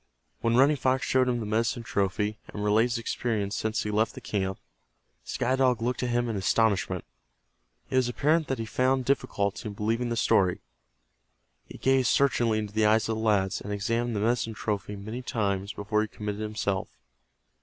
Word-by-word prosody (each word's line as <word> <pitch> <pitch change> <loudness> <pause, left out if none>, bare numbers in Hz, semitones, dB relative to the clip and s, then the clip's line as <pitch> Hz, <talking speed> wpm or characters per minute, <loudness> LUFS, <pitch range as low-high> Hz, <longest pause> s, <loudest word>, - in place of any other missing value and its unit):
When 115 0 +1
Running 140 +4 +5
Fox 130 0 +1
showed 130 -1 +2
him 120 -1 0
the 110 - -4
medicine 115 +2 0
trophy, 105 0 -1
and 105 - -6
related 110 +4 +3
his - - 0
experiences 110 -3 -2
since 110 +3 -1
he 105 - -2
left 110 +2 +1
the - - -7
camp, 95 -2 -2 0.7
Sky 130 +2 0
Dog 130 -3 +2
looked 120 +1 -1
at 125 - -1
him 120 0 +1
in 115 - -2
astonishment. 100 +1 +1 0.9
It 130 - +2
was 125 -1 +3
apparent 155 +6 +2
that 135 - -1
he 115 - -3
found 130 +3 +1
difficulty 110 -5 -1
in 105 - -6
believing 115 +4 -1
the 115 - -2
story. 95 -5 +2 1.1
He - - -10
gazed 135 -2 +2
searchingly 120 -4 +3
into 105 -1 -4
the 110 0 +3
eyes 110 0 +3
of 110 - 0
the - - -3
lad, 100 -4 +2
and 105 - -5
examined 115 +3 -1
the 100 - -1
medicine 115 0 0
trophy 105 -1 -3
many 110 +5 -6
times 100 -5 -1
before 105 +1 -1
he 110 - -1
committed 105 0 -5
himself. 105 -3 -2
110 Hz, 185 wpm, -27 LUFS, 105-120 Hz, 1.1 s, Running